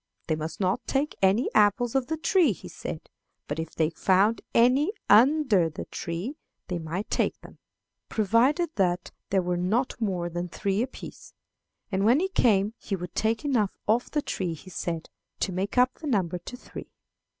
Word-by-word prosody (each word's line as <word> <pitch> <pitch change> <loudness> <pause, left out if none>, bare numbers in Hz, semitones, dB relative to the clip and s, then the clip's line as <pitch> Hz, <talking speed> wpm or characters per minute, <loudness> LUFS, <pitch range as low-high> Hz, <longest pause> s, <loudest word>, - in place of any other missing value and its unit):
They 160 - 0
must 155 +1 -5
not 185 -1 0
take 280 +2 0
any 195 +6 +3
apples 215 +4 +3
off 265 -2 +1
the 320 - -2
tree, 330 - +3
he - - -11
said, - - -7 0.4
but 145 +2 -3
if 160 -1 -5
they 160 0 +1
found 195 +6 +2
any 255 +9 +4 0.2
under 230 - +5
the 155 - -7
tree 180 - -5 0.3
they 175 -2 -2
might 170 +5 -4
take - - 0
them, - - -14 0.5
provided 245 - +2
that 180 -3 0 0.2
there 190 -2 +2
were 175 0 -1
not 220 +8 0
more 185 -5 -1
than 175 +1 -4
three 195 +4 -1
apiece; 255 +2 -7 0.6
and 195 0 0
when 240 +7 +5
he 380 +2 0
came 215 - +3
he 200 - -3
would 180 -1 -7
take 225 +5 0
enough 230 -8 +1
off 230 +4 +2
the 295 -2 -1
tree, 175 -4 -2
he 185 +4 -13
said, 165 -1 -4 0.3
to 195 - 0
make 190 +5 -3
up 250 +1 +5
the 315 - -8
number 185 - 0
to 250 +8 -9
three. - - -10
205 Hz, 180 wpm, -27 LUFS, 180-250 Hz, 0.6 s, under